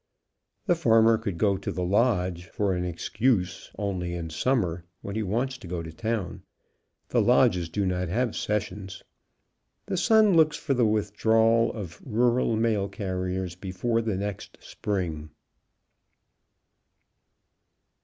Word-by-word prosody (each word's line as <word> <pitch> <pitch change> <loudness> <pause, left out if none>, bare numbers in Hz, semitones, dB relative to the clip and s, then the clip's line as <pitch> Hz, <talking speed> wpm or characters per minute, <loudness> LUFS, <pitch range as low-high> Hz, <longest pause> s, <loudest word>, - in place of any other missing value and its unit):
TKe 175 - +3
farmer 115 -6 +5
could, 100 -6 -4
go 100 0 +2
to 95 - -4
the 90 +1 -3
lodge, 90 -3 +1
for 100 -2 -1
an 90 0 -1
excuse, 95 +3 -1
only 90 -4 -2
in 85 -2 -5
summer, 90 -4 0 0.2
when 100 - -5
he 110 - 0
wants 120 +6 -2
to 100 - -10
go 85 -1 -4
to 80 - -8
town, 110 -5 -3 0.7
the - - +3
lodges 85 -2 +3
do 100 +4 -1
not 90 -1 -1
have 115 +6 -1
sessions. 100 -2 -3 0.8
The 190 - -2
Sun 215 +1 +5
looks 155 -2 +4
for 140 - -1
the 120 -3 +3
withdrawal 110 +2 +2
of 95 -8 -8
rural 120 0 +1
mail 110 -3 +1
carriers 95 -2 -3
before 95 +6 -2
next 100 -2 -4
spring. 85 -7 -4
100 Hz, 130 wpm, -26 LUFS, 90-115 Hz, 0.8 s, farmer